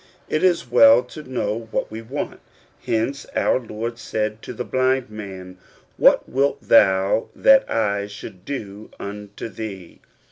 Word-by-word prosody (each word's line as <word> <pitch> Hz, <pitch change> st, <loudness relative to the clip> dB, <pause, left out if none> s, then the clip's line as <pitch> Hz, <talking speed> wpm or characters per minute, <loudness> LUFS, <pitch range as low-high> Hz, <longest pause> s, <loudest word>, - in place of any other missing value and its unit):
It 155 Hz, -, 0 dB
is 175 Hz, -7 st, +2 dB
well 115 Hz, 0 st, +7 dB
to 140 Hz, +5 st, -10 dB
know 115 Hz, -5 st, -3 dB
what -, -, -2 dB
we 110 Hz, +1 st, -6 dB
want. 130 Hz, +6 st, -5 dB, 0.5 s
Hence 125 Hz, +5 st, -1 dB
our -, -, +2 dB
Lord 115 Hz, 0 st, -6 dB
said 110 Hz, -1 st, -3 dB
to -, -, -8 dB
the 125 Hz, -, -4 dB
blind 130 Hz, -2 st, 0 dB
man, 95 Hz, -3 st, -9 dB, 0.4 s
"What -, -, +4 dB
wilt 140 Hz, +2 st, +1 dB
thou 95 Hz, -1 st, +3 dB
that 270 Hz, 0 st, +5 dB
I 100 Hz, -2 st, 0 dB
should 100 Hz, -2 st, -10 dB
do 105 Hz, -6 st, -6 dB
unto 100 Hz, +1 st, -7 dB
thee?' 100 Hz, -4 st, -8 dB
110 Hz, 145 wpm, -22 LUFS, 100-130 Hz, 0.5 s, well